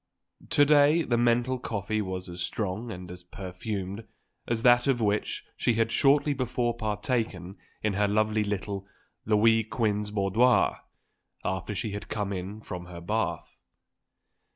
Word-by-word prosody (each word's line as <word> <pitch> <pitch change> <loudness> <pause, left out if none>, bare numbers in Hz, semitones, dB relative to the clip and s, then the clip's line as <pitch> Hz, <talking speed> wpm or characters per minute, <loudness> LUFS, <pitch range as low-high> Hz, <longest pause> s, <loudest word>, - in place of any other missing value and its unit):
To 145 - +5
day 150 +3 +5
the 120 - 0
mental 120 +2 +2
coffee 110 -2 -2
was 95 -2 -4
as 90 0 -7
strong 105 +4 -3
and 90 -3 -8
as 90 0 -9
perfumed 95 +3 -5 0.4
as 115 -1 -1
that 120 +1 +5
of 135 -3 +2
which 105 -1 -1
she 120 - +1
had 115 0 +1
shortly 145 +2 +4
before 125 -2 -1
partaken 105 -4 -2 0.3
in 105 -1 +1
her 105 +1 +2
lovely 110 +1 +2
little 100 -1 -3 0.4
Louis 110 +1 +4
Quinze 105 -2 -1
boudoir, 105 +5 +3 0.7
after 95 +2 -2
she 110 +2 -3
had 105 +1 -6
come 105 -2 -2
in 95 +3 -5
from 90 -4 -7
her 90 -1 -8
bath. 105 +6 -3
105 Hz, 145 wpm, -28 LUFS, 95-120 Hz, 0.7 s, To